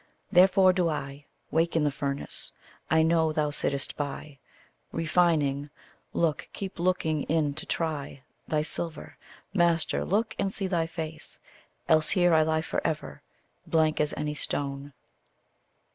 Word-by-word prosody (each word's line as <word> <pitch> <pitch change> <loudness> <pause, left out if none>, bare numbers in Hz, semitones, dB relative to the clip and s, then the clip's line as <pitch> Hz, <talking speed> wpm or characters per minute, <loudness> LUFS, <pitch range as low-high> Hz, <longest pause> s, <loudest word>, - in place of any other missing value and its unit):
Therefore 185 0 +6
do 180 -2 +1
I 140 -1 -5 0.3
Wake 165 +1 +1
in 160 - +3
the 145 - +2
furnace. 140 0 -4 0.4
I 160 0 +4
know 160 -1 +3
thou 150 -1 0
sittest 140 -1 -1
by, 145 0 -5 0.5
Refining 155 -4 +1 0.4
look, 165 -3 0
keep 195 -2 -6
looking 170 -4 +1
in 155 -2 +1
to 155 - -6
try 145 -4 -3 0.2
Thy 150 -1 +1
silver; 165 +1 -4 0.4
master, 170 -3 +2
look 220 +4 0
and 195 - 0
see 195 - -2
thy 170 -3 0
face, 160 -1 -6 0.5
Else 155 -1 +5
here 175 -2 +4
I 160 - +6
lie 160 0 +1
for - - -2
ever, 155 -2 -3 0.5
blank 160 -2 +2
as 150 - +1
any 150 0 -2
stone. 140 -1 -3
160 Hz, 140 wpm, -28 LUFS, 150-170 Hz, 0.5 s, Therefore